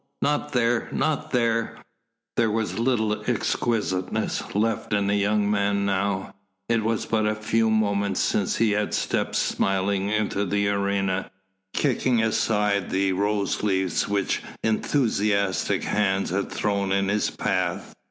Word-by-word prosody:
Not 145 Hz, +1 st, 0 dB
there! 120 Hz, -1 st, +1 dB
Not 155 Hz, -2 st, -1 dB
there!" 115 Hz, -2 st, 0 dB, 0.6 s
There 115 Hz, -1 st, +2 dB
was 110 Hz, +1 st, -2 dB
little 110 Hz, -3 st, +1 dB
exquisiteness 105 Hz, -6 st, -1 dB
left 110 Hz, +1 st, 0 dB
in 100 Hz, -1 st, +2 dB
the 100 Hz, +1 st, +1 dB
young 105 Hz, 0 st, +1 dB
man 100 Hz, -1 st, +1 dB
now. 95 Hz, 0 st, -1 dB, 0.3 s
It 115 Hz, -1 st, +1 dB
was 110 Hz, 0 st, 0 dB
but 110 Hz, -1 st, +1 dB
a 110 Hz, -, 0 dB
few 110 Hz, +1 st, +1 dB
moments 100 Hz, -3 st, +1 dB
since -, -, +1 dB
he 110 Hz, -2 st, +2 dB
had 105 Hz, 0 st, 0 dB
stepped -, -, -1 dB
smiling 95 Hz, 0 st, 0 dB
into 105 Hz, -1 st, 0 dB
the 100 Hz, +1 st, 0 dB
arena, 100 Hz, -1 st, 0 dB, 0.5 s
kicking 130 Hz, -3 st, +1 dB
aside 105 Hz, -3 st, +1 dB
the 95 Hz, 0 st, +1 dB
rose 100 Hz, +1 st, 0 dB
leaves 95 Hz, -3 st, 0 dB
which 100 Hz, -1 st, 0 dB, 0.2 s
enthusiastic 105 Hz, -4 st, +1 dB
hands 100 Hz, -3 st, 0 dB
had 100 Hz, +2 st, -1 dB
thrown 100 Hz, -2 st, -1 dB
in 100 Hz, 0 st, +1 dB
his 105 Hz, +1 st, +1 dB
path. -, -, -2 dB
105 Hz, 135 wpm, -25 LUFS, 100-110 Hz, 0.6 s, There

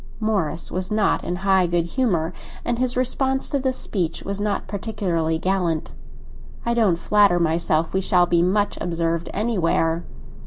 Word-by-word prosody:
Morris 205 Hz, -8 st, -1 dB
was 185 Hz, +1 st, -2 dB
not 215 Hz, -2 st, +1 dB
in 175 Hz, -, -2 dB
high 190 Hz, -2 st, +4 dB
good 170 Hz, -1 st, +1 dB
humour, 175 Hz, -6 st, 0 dB, 0.3 s
and 240 Hz, 0 st, -1 dB
his 250 Hz, -1 st, +1 dB
response 265 Hz, +1 st, 0 dB
to 280 Hz, -, +1 dB
this 260 Hz, -1 st, -1 dB
speech 170 Hz, -4 st, -2 dB
was 200 Hz, 0 st, -3 dB
not 205 Hz, -1 st, -1 dB
particularly 190 Hz, -5 st, -1 dB
gallant. 175 Hz, -3 st, -1 dB, 0.7 s
"I 235 Hz, -, +1 dB
don't 220 Hz, -7 st, +3 dB
flatter 200 Hz, -1 st, +3 dB
myself 160 Hz, -1 st, +1 dB
we 190 Hz, -, +1 dB
shall 180 Hz, -1 st, +3 dB
be 170 Hz, -1 st, +2 dB
much 205 Hz, +3 st, +1 dB
observed 165 Hz, -1 st, -1 dB
anywhere." 175 Hz, -6 st, 0 dB
185 Hz, 155 wpm, -22 LUFS, 170-215 Hz, 0.7 s, high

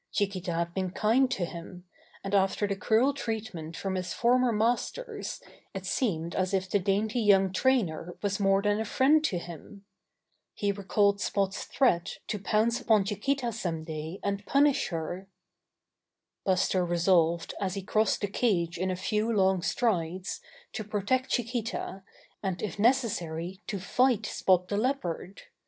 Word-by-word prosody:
Chiquita 190 Hz, -3 st, -1 dB
had 170 Hz, +1 st, -2 dB
been 185 Hz, -1 st, -1 dB
kind 225 Hz, +7 st, +2 dB
to 185 Hz, -8 st, -1 dB
him, 175 Hz, +1 st, -9 dB, 0.4 s
and 195 Hz, -, -4 dB
after 195 Hz, +1 st, +2 dB
the 200 Hz, -1 st, -1 dB
cruel 225 Hz, +7 st, +2 dB
treatment 210 Hz, -, -5 dB
from 195 Hz, -1 st, -3 dB
his 185 Hz, -1 st, -3 dB
former 250 Hz, +1 st, +3 dB
masters 245 Hz, -, -1 dB, 0.4 s
it -, -, -5 dB
seemed 170 Hz, -, -1 dB
as 185 Hz, +1 st, 0 dB
if 190 Hz, 0 st, -1 dB
the 205 Hz, -, +1 dB
dainty 205 Hz, +5 st, 0 dB
young 195 Hz, -3 st, +4 dB
trainer 185 Hz, -8 st, 0 dB
was 205 Hz, 0 st, 0 dB
more 195 Hz, 0 st, +3 dB
than 205 Hz, 0 st, +2 dB
a 220 Hz, -, -1 dB
friend 285 Hz, +8 st, +3 dB
to 185 Hz, -, 0 dB
him. 175 Hz, +4 st, -10 dB, 0.7 s
He 205 Hz, -1 st, 0 dB
recalled 200 Hz, 0 st, +1 dB
Spot's 195 Hz, +1 st, -1 dB
threat 180 Hz, -11 st, +1 dB
to 210 Hz, -, -2 dB
pounce 225 Hz, +5 st, +1 dB
upon 220 Hz, -5 st, +4 dB
Chiquita 235 Hz, +5 st, -1 dB
some 175 Hz, -8 st, -3 dB
day 160 Hz, +3 st, -6 dB
and 200 Hz, 0 st, -2 dB
punish 280 Hz, 0 st, +3 dB
her. 175 Hz, +3 st, -4 dB, 1.2 s
Buster 185 Hz, -1 st, +2 dB
resolved, 170 Hz, -1 st, +2 dB
as 190 Hz, -1 st, -1 dB
he 195 Hz, -, -4 dB
crossed 215 Hz, +1 st, +1 dB
the 205 Hz, -, 0 dB
cage 180 Hz, -6 st, 0 dB
in 185 Hz, +1 st, 0 dB
a 185 Hz, -, -1 dB
few 215 Hz, +4 st, -1 dB
long 190 Hz, -3 st, +3 dB
strides, 180 Hz, -2 st, -1 dB, 0.3 s
to 220 Hz, -, -3 dB
protect 215 Hz, +5 st, -1 dB
Chiquita, 235 Hz, -5 st, -2 dB, 0.4 s
and 190 Hz, -3 st, -3 dB
if 200 Hz, -2 st, -4 dB
necessary 190 Hz, -7 st, 0 dB
to 200 Hz, -, -3 dB
fight 250 Hz, +4 st, +2 dB
Spot 180 Hz, -1 st, +2 dB
the 205 Hz, -, -1 dB
Leopard. 205 Hz, -6 st, -2 dB
200 Hz, 155 wpm, -29 LUFS, 180-225 Hz, 1.2 s, young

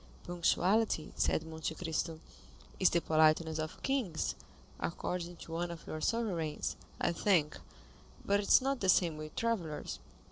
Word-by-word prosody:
"Punctuality," 175 Hz, +2 st, +1 dB
said 160 Hz, -, +1 dB
Monte 160 Hz, 0 st, -4 dB
Cristo, 160 Hz, -1 st, -2 dB, 0.6 s
"is 185 Hz, -, +6 dB
the 170 Hz, -, +2 dB
politeness 155 Hz, 0 st, +3 dB
of 155 Hz, 0 st, -5 dB
kings, 245 Hz, -13 st, 0 dB, 0.5 s
according 175 Hz, +1 st, -3 dB
to 165 Hz, -, -11 dB
one 170 Hz, +1 st, -2 dB
of 170 Hz, -2 st, -8 dB
your 155 Hz, -, -5 dB
sovereigns, 180 Hz, -10 st, -1 dB, 0.2 s
I -, -, +2 dB
think; 170 Hz, -4 st, +2 dB, 0.7 s
but 200 Hz, 0 st, +3 dB
it 200 Hz, -, -3 dB
is -, -, +7 dB
not 270 Hz, -1 st, 0 dB
the 190 Hz, -, 0 dB
same 170 Hz, -3 st, +4 dB
with 155 Hz, 0 st, -8 dB
travellers. 195 Hz, -10 st, -2 dB
170 Hz, 145 wpm, -33 LUFS, 160-195 Hz, 0.7 s, is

